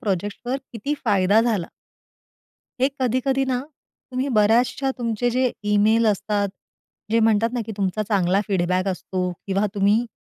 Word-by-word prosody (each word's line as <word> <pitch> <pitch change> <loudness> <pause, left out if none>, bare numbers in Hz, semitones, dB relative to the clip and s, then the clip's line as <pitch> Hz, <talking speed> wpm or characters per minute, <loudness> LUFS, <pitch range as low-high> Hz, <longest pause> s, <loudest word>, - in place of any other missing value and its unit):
प्रोजेक्टवर 205 +6 -2 0.2
किती 240 +6 -2
फायदा 200 +2 +4
झाला? 220 -7 0 1.1
हे 265 - +4
कधी-कधी 260 +2 +1
ना 255 -1 -1 0.5
तुम्ही 255 +2 -2
बऱ्याचशा 240 +5 +3
तुमचे 235 0 0
जे 255 +1 +1 0.2
ईमेल 220 +2 +4
असतात, 205 0 0 0.6
जे 230 - +3
म्हणतात 225 +1 +3
ना, 245 - -1
की 220 - -5
तुमचा 200 +1 -1
चांगला 195 -2 +2
फीडबॅक 185 0 0
असतो 185 -1 -2 0.2
किंवा 195 +1 +1
तुम्ही 205 +4 +2
215 Hz, 135 wpm, -23 LUFS, 200-245 Hz, 1.1 s, फायदा